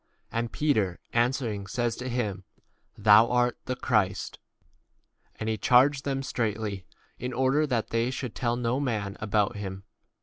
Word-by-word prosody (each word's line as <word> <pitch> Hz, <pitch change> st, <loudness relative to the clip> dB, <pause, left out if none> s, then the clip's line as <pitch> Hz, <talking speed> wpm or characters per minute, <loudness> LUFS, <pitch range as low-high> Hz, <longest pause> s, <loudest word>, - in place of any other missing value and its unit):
And 115 Hz, 0 st, -2 dB
Peter 110 Hz, -12 st, +1 dB
answering 120 Hz, -4 st, 0 dB
says 120 Hz, +2 st, -1 dB
to 125 Hz, +1 st, -4 dB
him, 105 Hz, -6 st, -2 dB, 0.5 s
30 -, -, -15 dB
Thou 110 Hz, +2 st, +7 dB
art 125 Hz, -1 st, +2 dB
the 130 Hz, -, -2 dB
Christ. 105 Hz, -6 st, 0 dB, 1.0 s
And 110 Hz, -, -5 dB
he 110 Hz, -1 st, -1 dB
charged 135 Hz, +2 st, +4 dB
them 135 Hz, -1 st, -1 dB
straitly, 105 Hz, -6 st, -2 dB, 0.3 s
2 -, -, -6 dB
in 125 Hz, -, -3 dB
order 135 Hz, +4 st, +2 dB
that 120 Hz, -5 st, -1 dB
they 115 Hz, +1 st, +1 dB
should 130 Hz, -2 st, -4 dB
tell 120 Hz, -1 st, -1 dB
no 120 Hz, +2 st, 0 dB
man 105 Hz, -7 st, -2 dB
about 105 Hz, +1 st, +1 dB
31 105 Hz, -2 st, -6 dB
him. 95 Hz, +1 st, -10 dB
120 Hz, 165 wpm, -27 LUFS, 105-130 Hz, 1.0 s, Thou